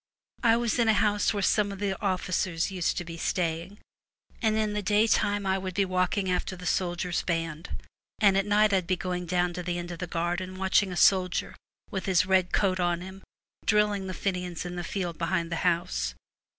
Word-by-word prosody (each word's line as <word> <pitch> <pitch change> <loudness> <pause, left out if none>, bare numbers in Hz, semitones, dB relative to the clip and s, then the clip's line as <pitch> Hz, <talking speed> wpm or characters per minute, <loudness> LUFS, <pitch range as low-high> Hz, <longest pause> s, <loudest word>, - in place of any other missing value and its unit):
I 230 -2 +4
was 235 0 0
in 235 - +3
a 220 - +5
house 205 0 +2
where 205 -2 -2
some 205 +1 +2
of 200 - -6
the 195 -1 -1
officers 185 -3 -1
used 180 -3 -1
to 175 - -3
be 165 0 -7
staying, 170 +3 -2 0.6
and 220 -2 +2
in 215 -1 0
the 210 - -1
daytime 205 0 +2
I 190 0 +1
would 185 -1 -5
be 200 - +2
walking 185 +1 0
after 185 +1 -1
the 180 0 -10
soldiers' 175 0 0
band, 165 -1 -3 0.5
and 200 -2 +4
at 195 +1 +1
night 210 0 +4
I'd 185 -3 +1
be 185 - +2
going 180 -1 -4
184 180 +2 -1
down 175 0 +1
to 180 - -4
the 175 0 -3
end 175 0 -5
of 170 - -7
the 180 - -4
garden 175 +2 -2
watching 190 +1 +2
War. 180 - -5
a - - -5
soldier, 185 -2 +3 0.4
with 190 -1 -3
his 185 -2 +3
red 185 -1 +2
coat 185 -2 +1
on 175 -1 +1
him, 190 +1 -9 0.5
drill 210 0 +4
ing 195 -2 -3
the 185 - -5
Fenians 180 -3 -3
in 175 0 -5
the 175 - -4
field 175 -2 -4
behind 170 0 -1
the 165 - -1
house. 60 - 0
185 Hz, 215 wpm, -28 LUFS, 175-200 Hz, 0.6 s, a